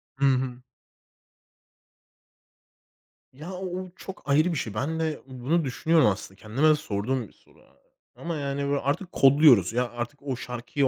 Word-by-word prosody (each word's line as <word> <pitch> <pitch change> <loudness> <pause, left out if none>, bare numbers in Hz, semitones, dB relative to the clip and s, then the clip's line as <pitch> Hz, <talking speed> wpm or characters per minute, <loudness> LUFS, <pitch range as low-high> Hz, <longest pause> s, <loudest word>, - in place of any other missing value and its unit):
Hı 140 - +1
hı. 130 -2 +1 2.7
Ya, 155 +7 -9
o 185 +1 -5
o 185 -1 -8
çok 190 - -9
ayrı 155 +5 +3
bir - - -2
şey. 110 -6 -3
Ben 155 +9 -2
de 160 -2 -2
bunu 135 +6 -1
düşünüyorum 155 +4 +3
aslında. 95 -1 -2
Kendime 125 +9 +2
de 155 - +6
sorduğum 125 -3 -2
bir - - -23
soru - - -25
a - - -23
a - - -33 0.3
ama 170 -1 -3
yani 140 -1 -2
böyle 140 0 +1
artık 160 +7 -2
kodluyoruz. 135 - +6
Ya, 125 0 0
artık 120 +4 -6
o 135 -3 -2
şarkıyı 125 +3 -2
140 Hz, 165 wpm, -26 LUFS, 125-155 Hz, 2.7 s, de